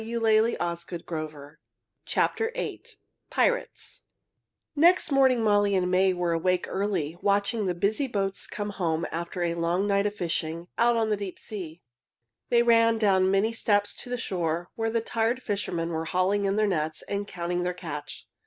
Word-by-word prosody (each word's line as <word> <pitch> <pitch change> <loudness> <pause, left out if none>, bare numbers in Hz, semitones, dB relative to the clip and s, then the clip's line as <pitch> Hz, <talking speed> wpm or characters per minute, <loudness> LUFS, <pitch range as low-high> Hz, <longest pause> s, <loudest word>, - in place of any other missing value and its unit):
[Illustration: 170 -9 -1 0.5
Pirates] 465 +3 -2 0.3
PIRATES - - -1 0.7
Next 335 +2 +4
morning 260 -4 +4
Molly 205 -2 +3
and 180 -1 +1
May 190 +1 +4
were 175 -1 -1
awake 180 +2 +1
early, 185 -5 -2
watching 200 +1 +1
the 180 - -1
busy 215 +10 0
boats 195 -5 -2
come 205 0 -4
home 170 -4 -1
after 170 +2 -3
a 170 -1 0
long 170 +3 0
night 200 0 +2
of 205 - -5
fishing 170 -2 -3
out 235 0 +4
on 220 -1 +1
the 210 - +1
deep 200 -3 -6
sea. 175 -6 -8 0.7
They 235 -1 +4
ran 230 -1 +4
down 195 -4 +3
the - - +2
many 200 +4 +2
steps 205 -2 +1
to - - -9
the 250 - -2
shore, 175 -5 -2
where 225 0 -1
the 230 0 0
tired 230 +3 -1
fishermen 180 -5 -2
were 160 -1 -2
hauling 190 +4 +1
in 195 0 +1
their 215 0 +3
nets 155 -5 -1
and 200 0 -3
counting 175 -1 -3
their 180 0 0
catch. 150 -5 -7
195 Hz, 160 wpm, -27 LUFS, 170-225 Hz, 0.7 s, Next